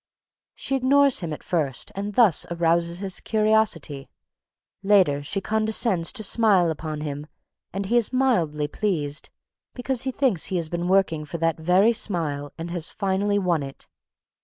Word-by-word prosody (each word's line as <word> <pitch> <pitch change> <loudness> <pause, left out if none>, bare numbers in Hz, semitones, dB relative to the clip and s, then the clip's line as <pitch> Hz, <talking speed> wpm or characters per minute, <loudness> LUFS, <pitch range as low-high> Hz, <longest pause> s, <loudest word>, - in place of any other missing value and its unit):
She 270 - -3
ignores 275 +1 +3
him 170 -3 -5
at 150 - -7
first 145 -8 -2
and 200 +1 -5
thus 220 -10 +4
arouses 170 0 0
his 195 -2 -3
curiosity. 215 -10 0 0.7
Later, 190 -8 +3
she 195 +7 -4
condescends 215 -4 +1
to 225 -4 0
smile 195 -5 +3
upon 155 -1 -5
him 145 0 -5 0.4
and 195 +1 -4
he 235 +5 +1
is 235 -1 +1
mildly 175 - +1
pleased, 155 -5 -3 0.5
because 250 0 -2
he 265 - -2
thinks 250 - 0
he 190 - -4
has 165 -3 -2
been 175 +1 -3
working 185 -5 +2
for 150 +3 -6
that 165 0 -1
very 185 +8 +3
smile 150 -9 -2
and 170 +1 -6
has 175 -1 -2
finally 200 0 -1
won 180 -5 0
it. 135 0 -9
180 Hz, 160 wpm, -24 LUFS, 160-215 Hz, 0.7 s, thus